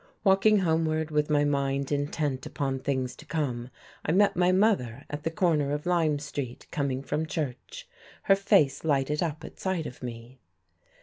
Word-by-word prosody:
Walking 195 +2 +5
homeward, 160 -3 +1
with 150 0 +1
my 145 -1 +3
mind 140 -1 0
intent 145 -2 -1
upon 135 -2 -2
things 130 -2 -2
to - - -12
come, 130 -6 -2 0.3
I - - 0
met 200 +4 +4
my 180 +1 +3
mother 185 - +1
at 145 0 -4
the 165 - -1
corner 160 -5 +1
of 150 0 -3
Lyme 165 -4 +2
Street 140 -4 -6
coming 135 -4 -1
from 155 +3 -2
church. 155 - -5 0.4
Her 195 - +5
face 190 -8 +3
lighted 150 -1 +1
up 160 -3 -2
at - - -12
sight 190 -4 -1
of 125 - -8
me. 120 +1 -8
150 Hz, 170 wpm, -28 LUFS, 135-170 Hz, 0.4 s, Walking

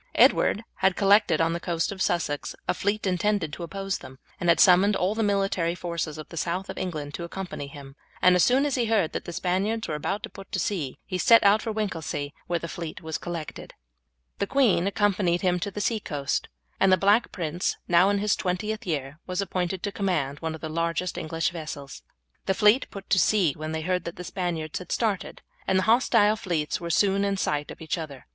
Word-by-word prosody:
Edward 215 - +4
had 190 -1 +2
collected 200 -5 +4
on 165 0 +2
the 170 - -2
coast 170 0 -1
of 195 -1 -6
Sussex 165 -6 -1
a - - +2
fleet 205 +2 -1
intended 185 -3 0
to - - -7
oppose 195 +2 -3
them, 130 - -12 0.2
and 175 - 0
had 170 - +5
summoned 195 +3 +6
all 185 +3 +1
the 225 - -2
military 195 -5 +1
forces 170 -3 -4
of 155 - -8
the 170 - -9
south 180 +4 -2
of - - -11
England 150 -5 -4
to 170 - -5
accompany 175 -4 -6
him; 140 -1 -11 0.2
and 180 0 +5
as 180 - +4
soon 265 +3 +4
as 290 - 0
he 245 -3 +1
heard 215 -7 +2
that - - -4
the - - -5
Spaniards 195 +6 -1
were 155 - -3
about 195 +8 -2
to 225 - -5
put 195 -1 -12
to 190 - 0
sea 165 -8 -2
he 185 -2 -3
set 230 +5 +6
out 205 +2 +5
for 225 - -3
Winchelsea, 165 -9 -3
where 175 - 0
the 170 - -5
fleet 165 -1 -7
was 160 -1 -3
collected. 170 -3 -7 0.6
The 200 - 0
queen 225 -9 +3
accompanied 195 -3 +1
him 180 -1 +1
to 200 - -2
the 200 - -6
sea 220 +1 0
coast, 145 -7 -2 0.3
and 195 - +4
the 185 - +6
Black 205 +5 +3
Prince, 170 0 -2
now 175 +2 +5
in 205 - +2
his 205 0 +1
twentieth 210 +4 -3
year, 145 -2 -3
was 180 0 -3
appointed 185 -1 -2
to 205 - -2
command 170 -9 -1
one 160 -1 -3
of 160 - -12
the 160 - -4
largest 165 +2 -1
of - - -23
the - - -2
English 165 0 -1
vessels. 150 -4 -7 0.5
The 190 - +2
fleet 210 +7 +4
put 195 -1 -9
to 190 - +5
sea 185 -9 +3
when 155 +1 -5
they 160 0 -2
heard 180 +2 -1
that 170 - -5
the 180 - -7
Spaniards 170 -4 -3
had 180 - -10
started, 215 -5 -1 0.2
and 190 - +3
the 190 - +2
hostile 220 -2 +4
fleets 170 -6 -2
were 170 - -4
soon 200 +3 +3
in 200 -1 0
sight 150 -5 -1
of - - -10
each 160 +2 -2
other. 140 -5 -8
180 Hz, 225 wpm, -26 LUFS, 165-200 Hz, 0.6 s, summoned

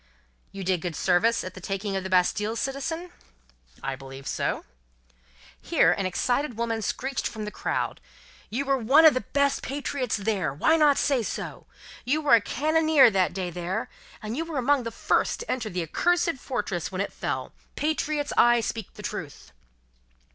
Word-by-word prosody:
"You 195 -1 -6
did 185 -2 0
good 175 -2 -4
service 205 +8 +2
at 185 - -6
the 185 - -10
taking 195 +2 -3
of 190 - -2
the 190 - -5
Bastille, 195 +4 +2
citizen?" 300 +8 -3 0.7
"I 135 0 -2
believe 135 0 -10
so." - - -2 1.0
Here, - - +3
an 195 -2 0
excited 245 +6 -1
woman 230 -1 -1
screeched 265 +6 -2
from 215 -2 -6
the 210 - -5
crowd: - - -2 0.5
"You 260 +6 -2
were 275 -1 +2
one 270 +8 +6
of 310 - +9
the 255 - -1
best 280 -1 +1
patriots 270 -3 -2
there. 195 -7 -1
Why 315 - +3
not 300 -3 +4
say 275 -4 +2
so? 220 - -5 0.4
You 285 +5 +1
were 295 -2 +3
a 230 - +7
cannonier 310 +2 +4
that 190 -2 +2
day 185 -2 -3
there, 175 +2 -3 0.3
and 215 +2 -4
you 320 - -1
were 330 -3 -5
among 260 0 +2
the - - -1
first - - 0
to 475 - -4
enter 235 -4 -2
the 180 -2 -2
accursed 345 - +1
fortress 205 -10 -3
when 185 - -4
it 200 - -3
fell. - - -4 0.2
Patriots, 300 -1 -1
I 240 0 +5
speak 225 -2 -5
the - - -10
truth!" - - -6
230 Hz, 175 wpm, -26 LUFS, 190-280 Hz, 1.0 s, of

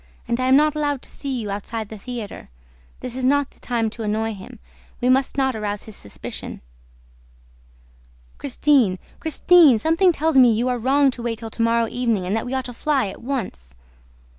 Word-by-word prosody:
and 235 +1 -1
I 255 - +1
am 260 - +6
not 300 +1 +4
allowed 290 -3 -1
to - - -9
see 280 - -6
you 210 -3 -4
outside 210 +2 -5
the 220 - -8
theater. 235 -1 -7 0.5
This 250 -1 -5
is 260 - -4
not 285 +2 +2
the - - -25
time 235 -2 -1
to 230 - -9
annoy 220 +1 -1
him. 190 -2 -11 0.4
We 250 - +1
must 265 +2 +2
not 265 -2 +1
arouse 210 -1 -3
his 220 - -10
suspicion." 100 - -8 1.8
"Christine! 265 -7 +2 0.2
Christine! 320 -3 +5
Something 330 - +3
tells 315 -3 +2
me 245 -3 +7
that 240 - +1
we 255 - +1
are 245 - -2
wrong 270 +3 +3
to 245 - -8
wait 235 -1 -2
till 225 0 -8
to 230 - -4
morrow 230 0 +2
evening 230 -6 -1
and 190 +4 -1
that 225 - -2
we 250 - -4
ought 260 - -2
to 245 - -6
fly 270 -3 0
at - - -10
once." 215 - -5
245 Hz, 200 wpm, -22 LUFS, 220-275 Hz, 1.8 s, me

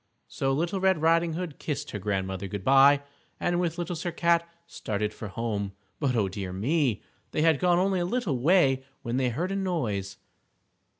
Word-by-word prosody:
_" - - -47 0.2
So 135 - -1
Little 170 +7 0
Red 190 -3 +3
Riding 165 +1 +3
Hood 170 -3 -5
kissed 150 -3 -4
her 105 - -4
Grandma 95 -1 -2
good 100 +1 -5
by 135 +3 +6 0.4
and 175 0 0
with 170 -1 -1
Little 175 0 -3
Sir 175 +2 -3
Cat 170 0 +2 0.2
started 105 -5 -3
for 110 - -7
home. 100 -1 -3 0.3
But, 135 -4 +1
oh, 105 -4 +2
dear 95 -1 -5
me! 120 - 0 0.3
They 155 - +1
had 160 -3 +4
gone 175 -1 +3
only 190 +1 +2
a 175 - 0
little 180 - -1
way 135 -3 +4 0.2
when 120 +1 -2
they 130 -1 +2
heard 170 +11 -2
a - - -1
noise. 120 - -2
145 Hz, 190 wpm, -27 LUFS, 105-175 Hz, 0.4 s, by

